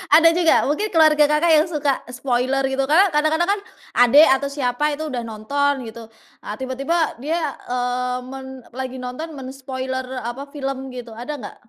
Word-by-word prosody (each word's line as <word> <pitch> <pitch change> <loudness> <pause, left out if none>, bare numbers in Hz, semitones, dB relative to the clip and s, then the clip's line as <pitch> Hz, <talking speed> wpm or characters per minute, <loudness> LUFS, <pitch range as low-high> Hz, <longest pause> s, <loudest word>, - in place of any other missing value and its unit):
Ada 330 +1 +7
juga? 340 -2 +4
Mungkin 360 +9 0
keluarga 310 -2 +5
Kakak 315 +3 +3
yang 310 +3 +4
suka, 290 -3 0
spoiler 255 +1 0
gitu 270 0 -1
kan. 370 +6 +5
Kadang-kadang 310 +4 +2
kan, - - -7 0.4
adek 270 +6 +7
atau 280 - -3
siapa 280 +1 0
itu, 315 +1 -5
udah 245 -3 -3
nonton 260 +4 -1
gitu. 225 0 -10 0.4
Ah 210 - -5
tiba-tiba 275 +6 -1
dia, 315 -2 -1 0.2
eee, 250 0 -1
men 265 0 -8 0.3
lagi 260 0 -4
nonton 255 +6 -6
men-spoiler 260 0 -5 0.2
apa, 245 +4 -5
film 270 -2 -4
gitu. 245 -2 -8
Ada 245 +6 -6
nggak, 210 - -9
270 Hz, 165 wpm, -21 LUFS, 250-300 Hz, 0.4 s, Ada